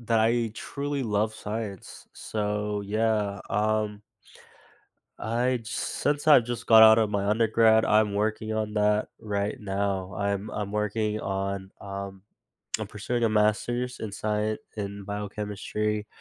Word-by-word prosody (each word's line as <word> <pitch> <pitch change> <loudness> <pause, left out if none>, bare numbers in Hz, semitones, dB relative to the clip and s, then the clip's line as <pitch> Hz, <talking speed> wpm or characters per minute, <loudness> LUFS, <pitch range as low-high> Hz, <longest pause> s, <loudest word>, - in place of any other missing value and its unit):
that 115 -1 +1
I 115 0 +2
truly 140 +3 -3
love 110 -1 0
science, 105 -3 -6
so, 105 -1 -2
yeah, 105 -1 0
um 105 0 0 1.2
I'd 120 +1 -1
since 145 +4 -1
I've 145 -6 +8
just 120 0 -5
got 110 -1 +8
out 110 0 +9
of 110 -2 +2
my 100 -1 -1
undergrad, 110 +1 +4
I'm 105 -1 +3
working 110 +1 -1
on 110 -1 -2
that 105 0 +2
right 105 -2 -2
now. 100 -2 -2
I'm 100 +1 -1
I'm 105 -1 -4
working 105 +1 -1
on, 95 -1 -3
um 100 -1 -7 0.6
I'm - - -4
pursuing 120 +3 -2
a - - +4
master's 115 +4 +1
in 110 - -5
scien 105 +1 -1 0.2
in 100 -1 -5
biochemistry, 105 +1 -3
105 Hz, 135 wpm, -27 LUFS, 100-110 Hz, 1.2 s, out